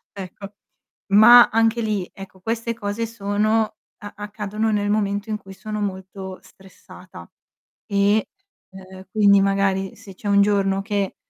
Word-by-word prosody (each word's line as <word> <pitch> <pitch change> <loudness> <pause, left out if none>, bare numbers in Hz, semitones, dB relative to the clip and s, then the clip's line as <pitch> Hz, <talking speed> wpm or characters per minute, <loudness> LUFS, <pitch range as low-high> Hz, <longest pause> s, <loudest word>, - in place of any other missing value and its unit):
Ecco, 200 +1 -9 0.6
ma 240 +4 +8
anche 225 +1 +1
lì, 210 -4 -2
ecco, 190 -1 -12
queste 230 +3 -3
cose 225 +1 -4
sono 215 0 -1 0.2
a 205 0 -10
accadono 210 +1 -3
nel 205 -1 0
momento 205 0 -1
in 215 - -2
cui 195 -1 -13
sono 210 +2 -6
molto 190 -1 -6
stressata, 185 - -15 0.6
e, 200 +2 +2 0.5
uhm, 190 0 -12
quindi 200 -2 +5
magari 195 -1 0
se 195 -2 -14
c'è 205 - -8
un 200 0 +4
giorno 195 -1 +1
che 200 -1 -2
205 Hz, 140 wpm, -22 LUFS, 195-215 Hz, 0.6 s, ma